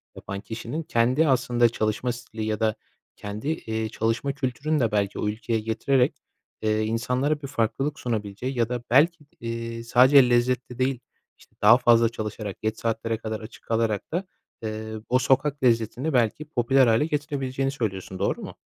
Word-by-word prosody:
yapan 100 0 -6
kişinin 120 +9 -5
kendi 130 +4 +2
aslında 120 -2 +3
çalışma 110 +2 -1
stili 115 -2 -6
ya 110 -1 -1
da 110 -1 +1 0.4
kendi, 105 +5 -6
eee, 110 -8 -2
çalışma 115 +6 -1
kültürünü 145 +3 -1
de 115 -4 +1
belki 100 -1 0
o - - -1
ülkeye 110 +2 -1
getirerek, 120 +4 +1 0.4
eee, 110 0 +1
insanlara 125 +7 0
bir 140 - -5
farklılık 135 +3 -1
sunabileceği 115 +2 -3
ya 115 -1 +1
da 125 -1 -3
belki 150 +4 +4
eee, 115 0 -5
sadece 125 +2 +6
lezzetli 125 +1 +1
değil, 130 -1 +1 0.4
işte, - - -23
daha 110 +3 +8
fazla 115 -2 +4
çalışarak, 105 -3 -6
geç 110 +1 -1
saatlere 115 0 -1
kadar 110 -1 -4
açık 110 +2 -12
kalarak 115 -3 -1
da, 175 +4 -1 0.4
eee, 110 0 -4 0.2
o 125 - +4
sokak 135 +2 +1
lezzetini 120 +5 +1
belki 125 +4 +1
popüler 130 -1 +3
hâle 115 +5 +3
getirebileceğini 135 -3 -2
söylüyorsun, 95 -8 -4
doğru 100 - 0
mu? - - -8
120 Hz, 160 wpm, -25 LUFS, 110-130 Hz, 0.4 s, daha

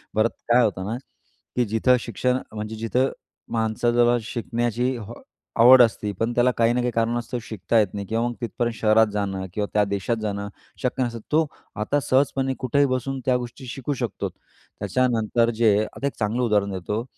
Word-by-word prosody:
परत 110 +2 +3 0.2
काय 125 +1 +6
होतं 95 -4 -1
ना, 115 - -2 0.6
की 125 - +2
जिथं 110 +4 +3
शिक्षण 125 +3 -1 0.2
म्हणजे 110 +1 -5
जिथं 120 +4 +1 0.4
माणसाला 120 +2 +2
शिकण्याची 120 +2 -1 0.6
आवड 125 +2 +9
असते, 110 -3 +2
पण 115 +1 0
त्याला 125 +1 +4
काही 115 0 +3
ना 125 - 0
काही 120 0 0
कारणास्तव 120 +2 -1
शिकता 110 +1 0
येत 105 - +3
नाही 100 -1 -4
किंवा 115 +3 0
मग, 120 - -3
तिथपर्यंत 120 0 -2
शहरात 110 0 +4
जाणं 95 -2 -2
किंवा 105 +1 -1
त्या 105 - +4
देशात 100 +3 -1
जाणं, 100 -1 -3 0.4
शक्य 130 +1 0
नसतं. 115 -1 -3
तो 160 +1 +4 0.4
आता 145 +7 +1
सहजपणे 135 0 +1
कुठेही 140 +2 +2
बसून 130 +1 -2
त्या 125 -1 +3
गोष्टी 125 +2 -8
शिकू 135 +3 -3
शकतो. 115 - -3
त्याच्यानंतर 120 -2 -1
जे 105 -3 +5 0.2
आता 140 - -2
एक 140 - -3
चांगलं 110 +3 0
उदाहरण 105 -3 +1
देतो. 105 +5 -3
115 Hz, 170 wpm, -24 LUFS, 110-125 Hz, 0.6 s, आवड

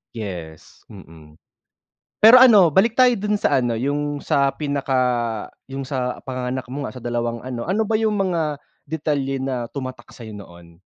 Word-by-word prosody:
Yes, 85 -8 -8
mm. 75 -2 -15 0.9
Pero 225 +4 +9
ano 210 -9 +7
balik 225 +5 +3
tayo 250 -1 +6
dun 210 +1 -1
sa - - +1
ano, 120 -1 -1
yung 145 +3 -2
sa 140 0 +2
pinaka, 140 -3 -1 0.7
yung 135 0 -5
sa 130 -2 -3
panganganak 130 0 -4
mo 140 +1 -4
nga, - - -7
sa - - -10
dalawang 120 -1 -3
ano, 120 -2 -5
ano 195 +6 0
ba 220 - -2
yung 220 -1 0
mga 165 -6 -1 0.3
detalye 145 -3 -2
na 130 -3 -3
tumatak 130 -3 -7
sa'yo 110 -3 -10
noon? 85 -3 -14
135 Hz, 160 wpm, -21 LUFS, 120-160 Hz, 0.9 s, Pero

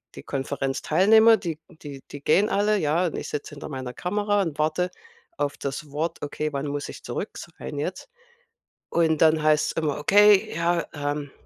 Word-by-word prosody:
die - - -9
Konferenzteilnehmer, 155 - +3
die 165 -5 -5
die 145 -5 -10
die 145 - -8
gehen 200 +9 +3
alle, 210 +1 +2
ja, 165 +1 +1
und 165 - -5
ich - - -5
sitze 150 - -5
hinter 145 - -8
meiner 130 -3 -5
Kamera 205 +4 0
und 165 -6 -3
warte 170 +4 0 0.5
auf 145 0 -2
das 140 +1 -5
Wort, 155 +4 -3
okay, 150 +1 -3
wann 140 +1 -2
muss 145 0 -4
ich - - -10
zurück - - -5
sein 145 - -8
jetzt? 180 - -4 0.8
Und 160 -2 +1
dann 160 -1 +5
heißt's 155 0 +3
immer: 155 -3 -1
„Okay, 205 +4 +5
ja, 170 +1 +1
ähm, 145 -1 -3
155 Hz, 175 wpm, -25 LUFS, 145-180 Hz, 0.8 s, dann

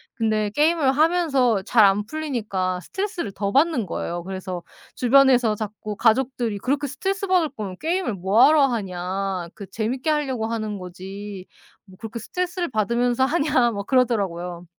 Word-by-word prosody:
근데 215 -3 0
게임을 300 -2 +3
하면서 275 - +2
잘 220 0 +5
안 200 +1 +2
풀리니까 215 -11 -2
스트레스를 380 - -4
더 200 0 -3
받는 280 - +2
거예요. 170 +1 -4
그래서 185 -1 -5 0.3
주변에서 250 -3 +4
자꾸 210 0 -6
가족들이 235 -1 +1
"그렇게 285 +5 -1
스트레스받을 380 - 0
거면 210 -8 -6
게임을 345 - -1
뭐 195 +5 +3
하러 300 -2 +5
하냐. 190 -4 -3
그 200 - -8
재밌게 235 +8 -2
할려고 270 -7 0
하는 215 -2 -3
거지. 190 +2 -8 0.4
뭐 185 -1 -17
그렇게 225 +1 -7
스트레스를 360 - -3
받으면서 240 +3 +1
하냐." 280 -5 +2
막 200 -1 -5
그러더라고요. 185 -9 0
230 Hz, 365 characters per minute, -23 LUFS, 195-280 Hz, 0.4 s, 잘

